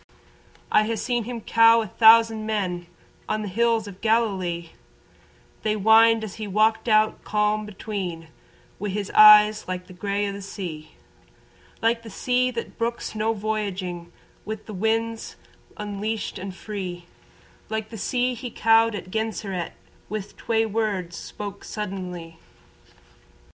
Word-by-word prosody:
I 215 - +4
ha' 225 - -1
seen 240 +1 -1
him 240 -1 -5
cow 230 +1 +5
a 220 - -4
thousand 225 +1 +5
men 180 -5 -2 0.4
On 215 - -1
the - - -4
hills 225 +2 +1
o' - - -6
Galilee, 190 -5 0 0.9
They 215 -1 0
whined 220 +2 +5
as 210 -3 -6
he 215 - -3
walked 215 +4 +2
out 215 0 +3
calm 210 0 0
between, 190 -5 -5 0.5
Wi' 205 +2 -3
his 200 0 -3
eyes 210 0 +8
like 180 0 -4
the 185 - -13
grey 200 +2 -2
o' - - -2
the 200 0 -7
sea, 175 -6 -7 0.9
Like 230 +1 +2
the 230 - -10
sea 250 +4 +1
that 235 -2 -6
brooks 235 -1 -2
no 220 +1 0
voyaging 195 -5 -3 0.3
With 215 0 -6
the 215 - -8
winds 225 +3 -1 0.4
unleashed 210 0 -4
and 190 0 -6
free, 185 -4 -6 0.6
Like 220 0 -3
the - - -7
sea 250 +4 0
he 245 +1 -6
cowed 225 0 +3
at 185 -2 -7
Genseret 210 -5 -3 0.4
Wi' 215 0 -2
twey 225 -1 0
words 200 -5 -2
spoke' 200 -1 -7
suddently. 180 -5 -6
215 Hz, 140 wpm, -24 LUFS, 195-225 Hz, 0.9 s, eyes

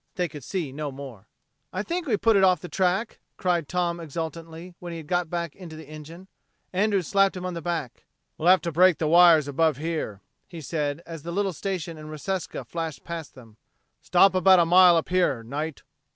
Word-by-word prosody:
They 180 -2 0
could 150 -3 -10
see 170 -5 -3
no 145 +1 -5
more. 130 -7 -10 0.4
"I 185 - -3
think 345 +6 -3
we 220 -5 +2
put 225 +1 +3
it 195 - +4
off 185 -1 +4
the 180 - -8
track," 190 +5 -1 0.2
cried 175 -5 0
Tom 175 -1 -1
exultantly 165 +2 -7
when 175 -1 -7
he 165 -1 -7
was 175 +3 0
back 170 -2 -4
in 180 -3 -10
the 160 -1 -10
engine. 155 +5 -11 0.5
Andrews 200 -1 +1
slapped 195 -1 +2
him 180 - -6
on 180 - -3
the 170 - -5
back. 160 -6 -4 0.3
"We'll 160 - -2
have 185 -2 +6
to 170 - -2
break 180 +2 +5
the 160 - -1
wires 165 -2 +6
above 150 0 +1
here," 155 -10 -4 0.3
he 170 - -9
said 150 +1 -3
as 165 -2 -8
the 170 +3 -6
little 195 +1 -1
station 175 -3 -4
in 155 0 -9
Reseca 180 +5 -4
flashed 165 -4 -5
past 165 -3 -7
them. 115 -4 -16 0.4
"Stop 185 +2 +4
about 185 0 +6
a 170 - +4
mile 180 0 +7
up 165 - -2
here, 175 -10 +1
Knight. 145 +5 -5
170 Hz, 205 wpm, -25 LUFS, 155-185 Hz, 0.5 s, mile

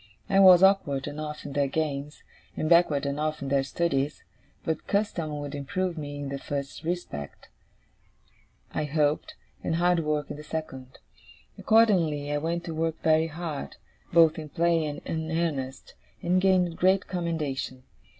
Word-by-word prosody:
I 195 - +3
was 185 -2 +8
awkward 150 -9 +3
enough 150 +1 -6
in 145 - -6
their 140 -1 +2
games, 145 0 -3 0.3
and 155 - -1
backward 165 -4 +4
enough 150 +2 -1
in 135 - -4
their 140 0 +3
studies; 140 0 -1 0.4
but 160 - -2
custom 170 -7 -1
would 145 0 -6
improve 170 +6 -2
me 145 -2 -6
in 145 -1 -5
the 140 0 -4
first 140 +2 -5
respect, 160 - -5 1.2
I 155 - -1
hoped, 150 0 0 0.3
and 165 - 0
hard 175 +1 +3
work 150 -2 -1
in - - -6
the 150 - -9
second. 135 -5 -6 0.6
Accordingly, 170 -10 +3
I 145 - 0
went 170 +3 -2
to 170 -2 -5
work 160 0 -1
very 160 0 +4
hard, 160 - -5 0.4
both 165 -1 +5
in 155 -1 -7
play 170 +1 +2
and 145 - -5
in 160 -1 -3
earnest, 145 -6 -2 0.3
and 180 +1 +2
gained 185 -3 +2
great 190 +1 +3
commendation. 150 -7 -3
155 Hz, 155 wpm, -27 LUFS, 145-170 Hz, 1.2 s, was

